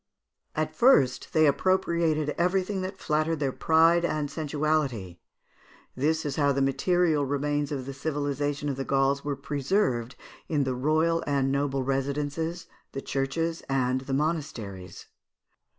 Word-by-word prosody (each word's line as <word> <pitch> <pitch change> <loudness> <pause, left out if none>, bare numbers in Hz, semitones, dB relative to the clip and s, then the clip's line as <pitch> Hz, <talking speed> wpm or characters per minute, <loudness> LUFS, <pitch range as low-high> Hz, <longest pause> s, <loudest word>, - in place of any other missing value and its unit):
At 155 0 -2
first, 145 - +4
they 155 -1 +4
appropriated 165 -2 +1
everything 185 +2 0
that 190 +1 -5
flattered 155 -1 0
their 140 -2 0
pride 165 +4 +4
and 155 -3 -1
sensuality. 145 - -1 0.8
This 155 +4 0
is 140 -2 -3
how 145 -2 +3
the 140 - 0
material 155 +3 +2
remains 145 +1 -1
of 135 -3 -3
the 135 - -6
civilisation 145 0 -2
of 140 -2 -2
the 135 - -2
Gauls 135 +1 +1
were 145 -1 -2
preserved 135 - -1 0.3
in 150 -3 +1
the 130 -1 -1
royal 155 +6 +1
and 135 -2 +1
noble 140 -1 0
residences, 145 +5 -2 0.3
the 135 - -4
churches, 165 +5 -2
and 130 -1 +1
the 135 +1 -5
monasteries. 125 - -3
145 Hz, 135 wpm, -27 LUFS, 135-160 Hz, 0.8 s, first